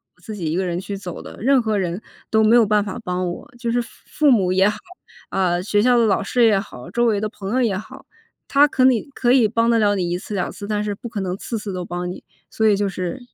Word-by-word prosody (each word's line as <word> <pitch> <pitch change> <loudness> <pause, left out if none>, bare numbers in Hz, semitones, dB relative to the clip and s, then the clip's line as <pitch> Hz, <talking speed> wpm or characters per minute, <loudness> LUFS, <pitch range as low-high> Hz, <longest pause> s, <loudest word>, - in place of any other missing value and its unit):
我 180 - -29
自 215 +4 -7
己 170 -6 -3
一 - - -1
个 190 - 0
人 175 -1 -2
去 200 +2 -5
走 185 -3 -7
的， - - -10
任 265 +2 +4
何 220 -2 0
人 180 0 -2 0.3
都 220 - +3
没 220 +2 +5
有 235 -2 +6
办 210 0 +2
法 195 - -5
帮 180 -1 -2
我。 175 - -8
就 235 -1 -2
是 240 +1 +1
父 260 +6 -1
母 195 -8 +3
也 190 +2 +4
好， 210 - -4 0.5
啊， 180 -2 +1
学 205 +2 +1
校 245 +2 +4
的 235 - +4
老 200 -3 +2
师 235 +4 +2
也 210 -3 +4
好、 170 - -9
周 240 +4 +1
围 215 -3 +2
的 215 - -1
朋 200 -2 -7
友 260 - +2
也 225 -6 +1
好， 255 +7 -9 0.4
他 285 +1 +5
可 260 - 0
你 250 -4 +4
可 245 - +2
以 250 -4 +5
帮 230 +2 +1
得 230 -1 +3
了 205 -1 +3
你 180 -3 -1
1 175 - 0
次、 210 +2 -7
2 180 - -2
次， 200 - -8
但 210 0 -1
是 210 -1 -2
不 235 +4 -8
可 215 -3 -4
能 185 -1 -2
次 230 - -4
次 205 -2 -6
都 180 -1 -4
帮 175 +1 -4
你， 180 - -8 0.3
所 220 - +1
以 205 -2 +4
就 205 0 0
是 185 +3 -4
205 Hz, 290 characters per minute, -21 LUFS, 185-230 Hz, 0.5 s, 有